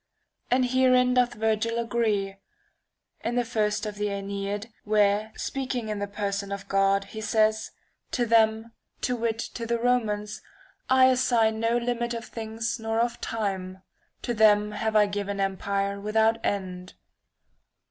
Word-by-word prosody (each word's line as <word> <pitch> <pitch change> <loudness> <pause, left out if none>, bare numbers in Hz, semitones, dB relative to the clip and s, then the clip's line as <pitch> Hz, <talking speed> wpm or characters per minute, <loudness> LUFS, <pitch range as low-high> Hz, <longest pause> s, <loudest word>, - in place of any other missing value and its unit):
And 250 +1 +3
herein 255 0 +4
doth 250 -1 +2
Virgil 220 +1 0
agree, 220 -4 0 0.9
in 240 - -1
the 245 -1 +1
first 215 -2 0
of 210 -1 -5
the 210 0 -1
JEneid^ 200 +2 -4
where, 210 0 +2
speaking 255 -4 -3
in 210 -1 -3
the 205 - -2
person 200 -1 -3
of 200 0 -5
God, 195 0 +2
he 220 +2 -8
says: 215 0 +1 0.2
' - - -46
To 245 - +1
them 225 0 +3 0.3
(to 250 - 0
wit, 230 -1 -1
to 230 0 -5
the 235 0 +1
Romans) 215 -3 0 0.5
I 260 0 +6
assign 240 -4 +3
no 230 +1 +2
limit 240 0 -1
of 230 - -6
things 225 +1 -4
nor 225 0 -1
of 235 0 -1
time. 190 -4 -3 0.4
To 240 - -1
them 210 -1 +4
have 220 +1 -2
I 210 -1 +6
given 200 0 -3
empire 200 +1 -1
without 220 +2 +2
end.' 185 -2 -3
220 Hz, 150 wpm, -26 LUFS, 205-235 Hz, 0.9 s, I